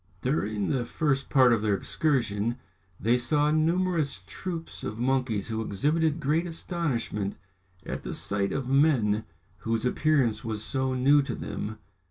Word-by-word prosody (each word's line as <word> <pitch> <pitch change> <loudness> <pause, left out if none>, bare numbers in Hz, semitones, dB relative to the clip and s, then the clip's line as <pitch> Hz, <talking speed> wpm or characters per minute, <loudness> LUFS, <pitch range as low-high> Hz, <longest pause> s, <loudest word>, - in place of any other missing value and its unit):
During 110 -6 -1
the 130 -3 +1
first 135 +2 -1
part 130 -4 +6
of 115 - +1
their 105 -2 +2
excursion, 120 -3 0 0.4
they 120 +3 +2
saw 150 +4 +2
numerous 160 - +1
troops 165 - -6
of 110 - -4
monkeys 125 -4 0
who 110 0 -2
exhibited 150 - +1
great 160 +4 +1
astonishment 145 - -2 0.5
at - - -4
the - - -5
sight 100 -1 0
of 135 -2 -2
men, 130 -7 +3 0.3
whose 115 +3 -2
appearance 125 -5 +2
was 110 -2 -3
so 130 +1 0
new 140 +3 +5
to 140 - -4
them. 105 +1 -5
130 Hz, 145 wpm, -27 LUFS, 110-150 Hz, 0.5 s, part